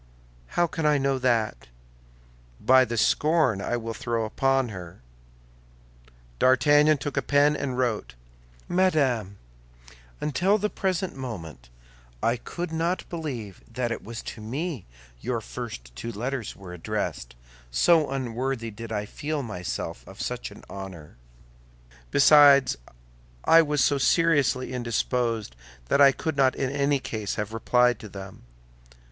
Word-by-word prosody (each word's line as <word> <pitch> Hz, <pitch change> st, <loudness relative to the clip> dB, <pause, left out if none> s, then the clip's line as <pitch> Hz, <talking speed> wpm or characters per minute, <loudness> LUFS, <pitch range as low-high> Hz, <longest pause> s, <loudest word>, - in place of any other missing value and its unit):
"How 175 Hz, -, +5 dB
can 165 Hz, -1 st, -4 dB
I 150 Hz, -1 st, +4 dB
know 135 Hz, -1 st, 0 dB
that?" 115 Hz, -, 0 dB, 0.9 s
"By 130 Hz, 0 st, +5 dB
the 115 Hz, 0 st, -4 dB
scorn 150 Hz, -, +2 dB
I 120 Hz, -, -1 dB
will 115 Hz, -1 st, -5 dB
throw 115 Hz, -1 st, -2 dB
upon 135 Hz, +3 st, +1 dB
her." 90 Hz, -, -9 dB, 1.4 s
D'Artagnan 145 Hz, +3 st, +5 dB
took 145 Hz, 0 st, -5 dB
a -, -, +3 dB
pen 145 Hz, +2 st, +3 dB
and 130 Hz, -4 st, -3 dB
wrote: 110 Hz, -, -1 dB, 0.5 s
MADAME, 135 Hz, -, +1 dB, 0.8 s
Until 180 Hz, +8 st, +2 dB
the 210 Hz, 0 st, -1 dB
present 190 Hz, -2 st, -2 dB
moment 80 Hz, -, -7 dB, 0.5 s
I 115 Hz, -, +3 dB
could 170 Hz, +7 st, -6 dB
not 165 Hz, +3 st, -1 dB
believe 130 Hz, -, -5 dB
that 120 Hz, 0 st, -2 dB
it -, -, -4 dB
was 115 Hz, +1 st, -7 dB
to 110 Hz, -, -8 dB
me 135 Hz, -, -4 dB, 0.3 s
your -, -, -2 dB
first -, -, -8 dB
two 115 Hz, -, -5 dB
letters 120 Hz, +2 st, -4 dB
were 95 Hz, -3 st, -10 dB
addressed, -, -, -4 dB, 0.3 s
so 150 Hz, -, +4 dB
unworthy 130 Hz, -2 st, -3 dB
did 115 Hz, +2 st, -9 dB
I 105 Hz, -1 st, -2 dB
feel 145 Hz, +6 st, -4 dB
myself 90 Hz, -7 st, -5 dB
of -, -, -12 dB
such -, -, -4 dB
an -, -, -14 dB
honor; 95 Hz, -8 st, -9 dB, 0.9 s
besides, 140 Hz, -, +6 dB, 0.7 s
I 165 Hz, 0 st, +7 dB
was 150 Hz, -3 st, +1 dB
so 140 Hz, -1 st, +2 dB
seriously 140 Hz, -5 st, +2 dB
indisposed 115 Hz, -, -1 dB, 0.3 s
that 145 Hz, -, +3 dB
I 140 Hz, -1 st, +8 dB
could 160 Hz, +3 st, -3 dB
not 135 Hz, -2 st, +3 dB
in 135 Hz, -1 st, -1 dB
any 140 Hz, 0 st, +1 dB
case 110 Hz, -6 st, -4 dB
have 105 Hz, 0 st, -4 dB
replied 125 Hz, +1 st, +2 dB
to 105 Hz, -, -9 dB
them. 95 Hz, 0 st, -10 dB
130 Hz, 135 wpm, -26 LUFS, 110-145 Hz, 1.4 s, I